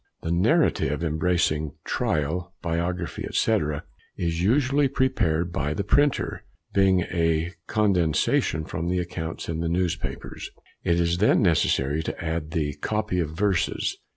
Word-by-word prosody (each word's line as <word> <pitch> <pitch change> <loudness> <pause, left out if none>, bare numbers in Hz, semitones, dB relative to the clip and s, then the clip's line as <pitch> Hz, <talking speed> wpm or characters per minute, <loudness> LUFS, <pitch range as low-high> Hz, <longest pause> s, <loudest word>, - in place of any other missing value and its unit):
The 80 - -2
narrative, 90 - +2
embracing 80 -2 0
trial, 85 +5 -1
biography, 85 +1 -2
&c., 110 -1 +3 0.6
is 85 -1 -1
usually 135 +7 +3
prepared 90 -11 +1
by 75 -1 -1
the 100 - -1
printer, 145 +7 +1 0.3
being 95 -2 +4
a 85 -1 0 0.2
condensation 85 -6 +1
from 80 +2 -4
the 90 +1 0
accounts 85 -2 -4
in 80 -1 -3
the 85 0 -1
newspapers. 90 0 -3 0.3
It 85 0 +2
is 85 0 +1
then 105 - +4
necessary 75 -4 +2
to - - -5
add 80 -1 -3
the 75 -3 -1
"copy 105 -4 -1
of 80 -4 0
verses." 100 -3 0
85 Hz, 130 wpm, -25 LUFS, 80-95 Hz, 0.6 s, being